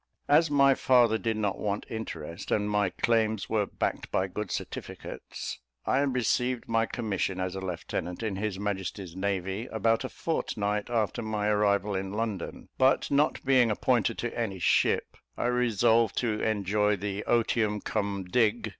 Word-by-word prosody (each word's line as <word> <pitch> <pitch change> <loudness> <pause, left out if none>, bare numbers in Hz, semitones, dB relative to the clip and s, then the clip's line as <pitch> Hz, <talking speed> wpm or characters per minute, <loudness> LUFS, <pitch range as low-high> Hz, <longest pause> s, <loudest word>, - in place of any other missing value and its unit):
As 155 +2 +5
my 140 -1 +5
father 120 -4 +4
did 115 -1 -1
not 105 -3 -1
want 105 0 -2
interest, 85 -6 -6
and 105 -1 +1
my 105 -2 +2
claims 110 +1 0
were 105 -3 +2
backed - - -3
by 95 - +1
good 95 +2 -5
certificates, - - -6 0.3
I 135 - +2
received 125 -2 0
my 115 0 +2
commission 100 -4 -2
as 95 -1 -2
a 95 - -4
lieutenant 90 +1 -4
in 105 -3 -1
his 105 -1 -2
Majesty's 95 -3 -4
navy 95 +3 -2
about 115 +1 +1
a - - -4
fortnight 105 -10 -2
after 115 -3 0
my 105 -2 -1
arrival 105 -1 +2
in 95 +1 -3
London; 105 -4 -4
but 130 +2 +3
not 145 +1 +2
being 130 -3 +5
appointed 115 +1 +1
to 120 - -3
any 110 -5 -2
ship, 90 - +2 0.2
I - - -1
resolved 115 -2 +3
to 110 -3 0
enjoy 105 0 +1
the 100 +1 -4
"otium 110 -3 +2
cum 100 -2 -2
dig. 110 +3 +1
105 Hz, 155 wpm, -28 LUFS, 100-115 Hz, 0.3 s, As